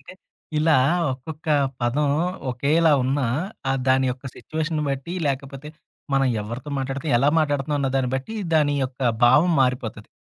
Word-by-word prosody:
అంటే, - - -11 0.5
ఇలా 155 -1 +4 0.4
ఒక్కొక్క 155 +5 -9 0.3
పదం 135 +5 +1 0.4
ఒకేలా 150 +6 +2
ఉన్నా, 135 +1 0 0.4
ఆహ్, 135 - +1
దాని 130 0 +3
యొక్క 130 +2 -7
సిట్యుయేషను 155 0 -3
బట్టి, 140 +5 -3
లేకపోతే 140 +1 -4 0.5
మనం 135 0 +3 0.2
ఎవ్వరితో 120 +7 -7
మాట్లాడితే, 135 +2 -3
ఎలా 140 - +3
మాట్లాడుతన్నాం 145 -1 0
అన్నదాన్ని 135 -2 0
బట్టి, 135 +12 -6 0.2
దాని 145 -2 +3
యొక్క 130 0 -8 0.2
భావం 150 +8 +5
మారిపోతది. 125 -4 -2
135 Hz, 135 wpm, -23 LUFS, 130-150 Hz, 0.5 s, భావం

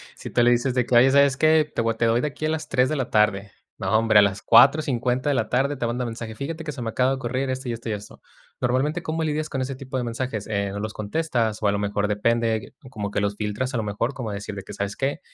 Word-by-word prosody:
Si - - -8
tú 120 - +3
le 120 - +5
dices 120 +2 +1
de 125 -1 +1
que: 125 - +1
“Oye, 125 +3 +6
¿sabes 140 -2 +4
qué? 155 -1 +3
Te - - +1
voy 115 0 +1
a - - -17
te 115 - +1
doy 115 +1 +3
de 150 - 0
aquí 150 +2 -5
a - - -1
las 155 -1 -2
3 130 0 +2
de 155 - -1
la 130 -3 -2
tarde”, 105 -2 +2 0.3
no, 110 - -1
hombre, 110 -1 +5
a - - +8
las 100 0 0
4:50 130 -2 +4
de 145 - +2
la 110 - -1
tarde 135 +3 +1
te 120 - -2
manda 120 +2 -2
mensaje: 115 -1 -5
“Fíjate 160 +7 -5
que 150 - -4
se 130 -3 -8
me 115 - -2
acaba 130 +3 +1
de - - +1
ocurrir 130 +1 -2
esto, 130 0 -4
y - - -1
esto, 115 0 -6
y - - -1
esto”. 105 0 -9 0.4
Normalmente, 135 +7 0
¿cómo 160 +1 -2
lidias 155 0 -2
con 135 - -3
ese 135 +1 -3
tipo 130 0 -8
de 125 - -1
mensajes? 115 -2 -4
Eh, 100 -2 -1
¿no 100 - -5
los 110 +1 -3
contestas? 115 -1 -1
O - - +3
a 100 - +3
lo 100 - -1
mejor 105 0 -1
depende, 115 +2 +1
eh, 110 - -7 0.2
como 105 -5 -5
que 100 - -1
los 100 0 -1
filtras 110 +5 -2
a 120 - 0
lo 110 - -1
mejor, 105 +5 -2
como 115 -5 -4
decir 100 0 -6
de 100 - -6
que: - - -10
“¿Sabes 100 0 -3
qué? 135 +1 -1
120 Hz, 295 wpm, -24 LUFS, 110-135 Hz, 0.4 s, a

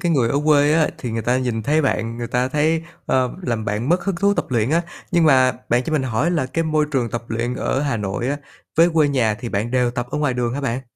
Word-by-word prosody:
cái 175 -3 +1
người 130 -7 +2
ở 140 +4 +1
quê 150 -1 +4
á, 160 -1 +3
thì 125 - -4
người 115 0 -2
ta 125 +1 +1
nhìn 120 -4 -2
thấy 155 +6 +2
bạn, 115 -4 -1
người 120 0 -4
ta 125 +2 0
thấy 155 +3 +1 0.2
ơ, 130 -1 +1
làm 115 -8 -2
bạn 105 +5 -2
mất 175 +1 +2
hứng 195 -3 -1
thú 200 +3 +2
tập - - -2
luyện 120 -1 0
á. 165 +2 +2 0.3
Nhưng 170 -1 +4
mà 130 -4 +5 0.2
bạn 120 +1 +2
cho 160 - -3
mình 150 -3 +1
hỏi 130 +6 0
là 155 -7 0
cái 165 +5 -2
môi 155 -1 +1
trường 125 -5 0
tập 120 +1 -3
luyện 115 +2 -2
ở 130 - -1
Hà 140 -5 -1
Nội 105 +3 -3
á, 145 - 0 0.4
với 165 +1 +6
quê 150 -3 +4
nhà 120 -6 +1
thì 120 +3 -6
bạn 105 +2 -2
đều 125 -1 +2
tập 125 -1 -3
ở - - -2
ngoài 145 -4 0
đường 120 -1 -1
hả 140 - -3
bạn? 130 -2 -2
130 Hz, 280 wpm, -21 LUFS, 120-150 Hz, 0.4 s, với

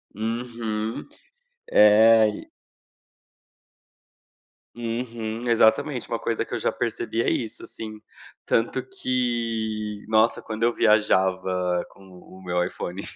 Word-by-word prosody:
Uhum. 115 -1 -3 0.7
É, 110 +1 +7
e 105 - -7 2.3
Uhum, 115 0 -4
exatamente, 120 +4 +3
uma 115 - -3
coisa 115 - -2
que - - -10
eu - - -1
já - - 0
percebi 115 - -2
é - - +1
isso, 115 -3 -3
assim. 110 -1 -8 0.5
Tanto 120 +3 0
que 115 -5 -2
nossa 110 +1 +3
quando 110 0 -6
eu 120 0 +3
viajava 95 -5 +2
com 95 0 -18
o 95 0 -15
meu 90 -1 0
iPhone 90 +1 -5
110 Hz, 110 wpm, -24 LUFS, 105-115 Hz, 2.3 s, É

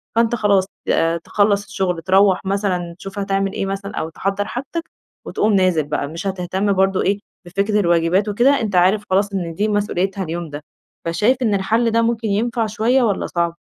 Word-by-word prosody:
فأنتَ 230 +1 +3
خلاص 200 -4 +2 0.2
آآ 165 +1 +2
تخلّص 205 +4 +1
الشغل، 190 -4 -2
تروّح 190 +2 +3
مثلًا 190 -3 -1
تشوف 195 +2 -7
هتعمل 195 0 -1
إيه - - -2
مثلًا 195 +1 -4
أو 160 - -3
تحضَّر 195 +4 -2
حاجتك 275 +9 -4 0.4
وتقوم 215 0 0
نازل 185 -5 +3
بقى، 145 0 -2
مش 165 +6 -6
هتهتم 190 +2 -1
برضه 190 0 +2
إيه، 200 +1 +1 0.3
بفكرة 200 +4 0
الواجبات 175 +2 +2
وكده، 250 +7 +3
أنتَ 210 -4 -2
عارف 190 +4 +4
خلاص 200 +2 +1
إن 175 -4 -3
دي 205 +6 0
مسئوليتها 200 -2 -1
اليوم 170 -1 -5
ده. 145 +1 -8 0.4
فشايف 205 +10 +2
إن 220 -4 +2
الحل 225 +4 +1
ده 230 +1 +3
ممكن 230 -1 0
ينفع 225 +3 0
شوية 235 +5 +2
والّا 205 -5 0
صعب؟ 170 -1 -1
195 Hz, 180 wpm, -20 LUFS, 180-210 Hz, 0.4 s, عارف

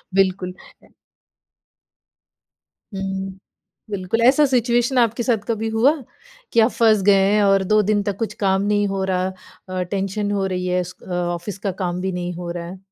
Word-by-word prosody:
बिल्कुल। 185 -1 +1 2.4
हुँ। 190 0 -4 0.5
बिल्कुल, 200 +2 -1
ऐसा 265 +5 +6
सिचुएशन 240 0 +2
आपके 230 0 +2
साथ 225 -4 0
कभी 225 -1 -1
हुआ 225 +6 +4 0.6
कि 230 - +5
आप 225 - +4
फँस 220 -4 +3
गए 200 +1 +4
और 195 -1 +4
2 215 +3 +3
दिन 205 0 +1
तक 200 -2 -3
कुछ 225 - -3
काम 195 0 +2
नहीं 205 0 +1
हो 195 -1 -2
रहा 185 -1 0 0.4
अ, 185 0 -2
टेंशन 195 +2 -2
हो 195 -1 0
रही 180 -1 -2
है 180 0 +1
उस 180 0 -6
अ, - - -15
ऑफ़िस 175 +3 -3
का 195 -1 -2
काम 180 -1 -2
भी 190 0 -2
नहीं 180 0 -3
हो 175 0 -6
रहा 170 0 -5
है? 185 +2 -9
195 Hz, 170 wpm, -21 LUFS, 185-215 Hz, 2.4 s, ऐसा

